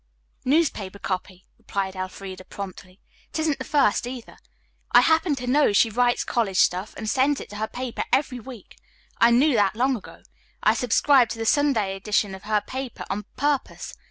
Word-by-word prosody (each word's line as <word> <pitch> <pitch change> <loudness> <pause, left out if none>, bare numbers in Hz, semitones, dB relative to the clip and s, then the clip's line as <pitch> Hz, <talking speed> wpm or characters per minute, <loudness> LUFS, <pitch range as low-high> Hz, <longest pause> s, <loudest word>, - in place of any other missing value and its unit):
"Newspaper 255 - 0
copy," 185 -1 -5
replied 195 -1 -3
Elfreda 185 0 -7
promptly. 185 -1 -9 0.3
"It - - -4
isn't 315 -2 0
the - - -3
first, 240 -5 +2
either. 245 -2 -8 0.5
I - - +8
happen 320 -1 +2
to 250 -2 -6
know 260 -3 +3
she 225 +2 +4
writes 245 +2 +2
college 205 -6 -1
stuff 185 +3 +2
and 220 - -5
sends 275 +4 +2
it - - -9
to 205 - -8
her 220 +1 -2
paper 250 0 -4
every 265 -3 +1
week. 240 -4 -12 0.4
I 235 - +6
knew 260 +5 +4
that 205 -3 +2
long 260 +3 +2
ago. 215 - -11 0.4
I 215 - +5
subscribed 250 +2 +3
to - - -10
the 225 - -3
Sunday 225 -8 +2
edition 205 0 0
of 190 - -10
her 210 -1 +1
paper 260 -2 -6
on 205 +1 -3
purpose. 285 0 -2
230 Hz, 180 wpm, -24 LUFS, 200-265 Hz, 0.5 s, I